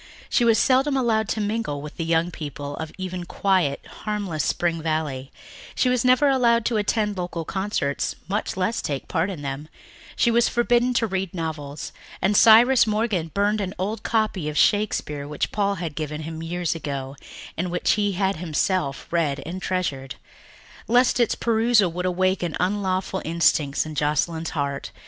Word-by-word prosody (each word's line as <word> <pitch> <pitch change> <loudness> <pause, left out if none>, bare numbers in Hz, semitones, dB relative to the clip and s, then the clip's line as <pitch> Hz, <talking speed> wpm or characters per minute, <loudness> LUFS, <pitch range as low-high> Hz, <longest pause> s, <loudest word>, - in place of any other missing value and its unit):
She 245 - +2
was 230 -1 +4
seldom 270 +2 +3
allowed 220 -4 +1
to - - -1
mingle 210 -8 -2
with 150 +1 -9
the 165 - -2
young 165 +1 +1
people 145 -3 -6
of 160 -1 -5
even 185 -1 -4
quiet, 175 -5 0
harmless 200 -8 -3
Spring 170 -2 0
Valley; 155 -5 -2 0.4
she 255 - +2
was 250 -1 +1
never 255 +3 +4
allowed 235 -4 +3
to 235 - +1
attend 210 -1 0
local 175 -2 -4
concerts, 190 -8 -2
much 200 0 -2
less 190 +5 0
take 140 -2 -4
part 175 +2 0
in 170 -7 -6
them; 140 +2 -5 0.5
she 235 - +3
was 235 0 +3
forbidden 240 +1 +2
to 230 - +3
read 190 -3 -3
novels, 155 -3 -5 0.3
and 195 +3 +1
Cyrus 230 +4 +7
Morgan 210 -6 0
burned 205 +1 +1
an 190 0 -4
old 205 +5 -3
copy 215 -8 0
of 150 - -5
Shakespeare 150 -9 +1
which 150 -1 -2
Paul 200 -1 0
had 165 -4 -4
given 155 0 -4
him 160 +1 -6
years 175 +1 -2
ago 140 -4 -5 0.4
and 175 +2 -2
which 175 0 +1
he 205 -2 +1
had 190 -1 0
himself 160 -2 -1
read 145 -5 0
and 185 +3 -5
treasured, 140 -10 -2 0.7
lest 245 +2 +3
its 235 - +2
perusal 225 -5 +2
should 180 +1 -3
awaken 185 -2 0
unlawful 190 0 -1
instincts 155 -4 +2
in 155 - -6
Joscelyn's 155 +3 0
heart. 140 -1 -2
185 Hz, 165 wpm, -24 LUFS, 155-215 Hz, 0.7 s, Cyrus